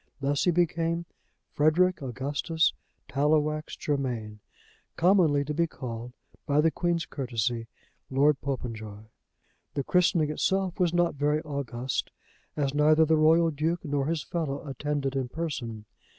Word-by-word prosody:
Thus 140 +1 0
he - - +4
became 170 0 +1 0.5
Frederic 170 +4 +3
Augustus 140 +6 0 0.3
Tallowax 150 +2 +1
Germain, 120 -7 -2 0.6
commonly 165 -6 +4
to 150 - -3
be 170 +2 +1
called, 120 -4 -7 0.3
by 145 0 +3
the 160 +1 +4
Queen's 170 -1 0
courtesy, 120 -3 -2 0.4
Lord 140 +1 +3
Popenjoy. 110 -6 -5 0.7
The 140 - 0
christening 170 -2 +2
itself 190 +3 0
was 175 -2 +3
not 175 0 +2
very 145 +2 +1
august, 130 -4 -3 0.5
as 140 -2 0
neither 155 +2 +5
the 160 +1 +3
Royal 160 +2 +4
Duke 160 +4 -1
nor 140 -2 0
his 165 -2 -1
fellow 155 -3 -3
attended 140 0 -2
in 130 -2 -1
person. 120 -9 -4
150 Hz, 130 wpm, -28 LUFS, 135-165 Hz, 0.7 s, neither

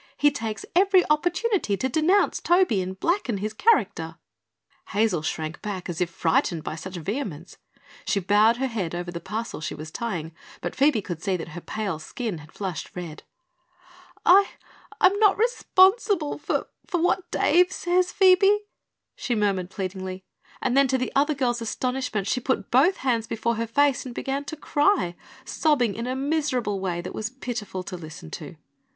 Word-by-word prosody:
"He 290 - +4
takes 220 -6 -4
every 380 0 +5
opportunity 350 - +1
to 260 - 0
denounce 320 +9 +2
Toby 345 - +3
and 190 +1 -6
blacken 335 - 0
his 210 +2 -3
character." 455 - +1 0.7
Hazel 205 -6 +1
shrank 155 0 -4
back 200 -4 -5
as 175 0 -4
if 175 - +1
frightened 165 -1 0
by - - -4
such 185 +3 -8
vehemence. 180 - -5 0.5
She 200 - +1
bowed 210 +5 +4
her 265 - 0
head 200 -9 -3
over 175 0 -4
the 170 - -5
parcel 215 0 -5
she - - -4
was 155 +1 -8
tying, 175 -9 -4 0.3
but - - -5
Phoebe 270 -6 +3
could 170 -3 -6
see 190 -2 0
that 165 - -7
her 175 +2 -8
pale 200 -6 -3
skin 200 +2 -5
had 150 +1 -14
flushed 190 -5 -5
red. 170 -4 -7 1.0
"I 390 +3 +7 0.5
I'm 390 +2 +4
not 415 -3 +5
responsible 390 -7 +3
for 295 - -1 0.2
for 355 -4 -1
what 355 +1 +1
Dave 360 +2 +3
says, 360 -1 +1
Phoebe," 390 +2 +5 0.5
she 245 - -2
murmured 195 -4 0
pleadingly; 190 -1 -5 0.4
and 245 - +1
then 275 0 +5
to 260 0 +1
the 255 - -2
other 295 +2 +3
girl's 240 -3 0
astonishment 250 -2 -2
she 235 - 0
put 255 -6 -1
both 290 +10 +4
hands 230 -3 +1
before 230 +1 -1
her 230 0 -2
face 280 +3 +2
and 245 - -8
began 275 +1 -3
to 315 - -5
cry, 295 - +1 0.3
sobbing 260 -8 +1
in 230 +3 -4
a 255 - -2
miserable 265 -7 -1
way 180 -2 -2
that 175 - -7
was 215 0 -3
pitiful 235 -7 -5
to 185 - -6
listen 155 - -10
to. - - -7
230 Hz, 170 wpm, -25 LUFS, 185-300 Hz, 1.0 s, I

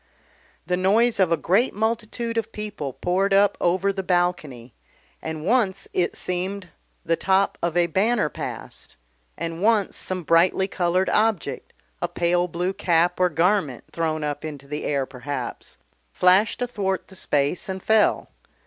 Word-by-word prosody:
The 180 +2 0
noise 215 +5 +3
of 185 -3 +3
a 165 - +3
great 195 - +1
multitude 230 +2 -2
of 225 -1 -2
people 210 -10 -5
poured 195 +6 +1
up 200 0 +4
over 190 +3 +2
the 190 - -3
balcony, 175 - -1 0.5
and 160 -1 -5
once 200 -3 +1
it 175 -1 0
seemed 185 +1 -3 0.4
the 165 - +2
top 190 +3 +1
of 170 0 -1
a 175 - +4
banner 195 +3 +1
passed, 150 - -8 0.4
and 165 +1 -4
once 210 -2 +2
some 185 -1 -4
brightly 175 +4 +3
coloured 185 0 0
object, 215 -5 0 0.3
a - - 0
pale 175 +1 +1
blue 180 +2 -2
cap 175 -1 +1
or 180 0 +4
garment 170 - +1
thrown 155 -2 -2
up 145 -1 -3
into 145 -3 -7
the 150 +1 -5
air 140 -2 0
perhaps, 130 -1 -6 0.3
flashed 190 +7 +3
athwart 200 -6 -2
the 190 - -12
space 145 +2 -1
and 190 0 -5
fell. 220 -1 +2
180 Hz, 150 wpm, -23 LUFS, 165-200 Hz, 0.5 s, up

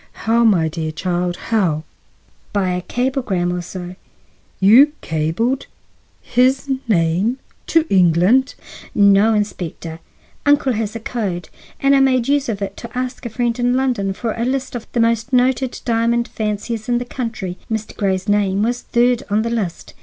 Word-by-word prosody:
"How, 230 +1 +3
my 185 -8 +4
dear 160 0 -3
child, 175 +1 -2 0.2
how?" 170 -8 +1 0.7
"By 195 -3 +1
a 180 - -2
cablegram 240 -7 -1
or 180 - -2
so." 180 +1 -7 0.6
"You—cabled—his 225 - +3 1.2
name—to 215 - 0
England?" 185 - +3 0.4
"No, 200 +2 +5
Inspector; 170 -5 -4 0.4
uncle 285 -2 +3
has 220 -1 -3
a - - -3
code, 205 -7 -4 0.3
and 275 0 +4
I - - +5
made 255 -3 +3
use 285 -2 +1
of 205 -3 -2
it 195 0 -5
to 235 +1 -8
ask 255 -1 -3
a - - -6
friend 240 +1 -1
in 245 +1 +2
London 245 -7 0
for 225 +3 -3
a 230 - -2
list 260 +1 -2
of 240 -2 -7
the 240 - 0
most 230 +2 +1
noted 255 0 +2
diamond 235 0 +1
fanciers 215 +1 -3
in 240 - +2
the 245 - -3
country. 225 -8 -5
Mr. 220 -1 -3
Grey's 190 -1 -1
name 205 -1 +2
was 240 +2 -1
third 240 0 +2
on 210 +2 +1
the 230 - -2
list." 200 -8 -3
225 Hz, 155 wpm, -19 LUFS, 190-245 Hz, 1.2 s, No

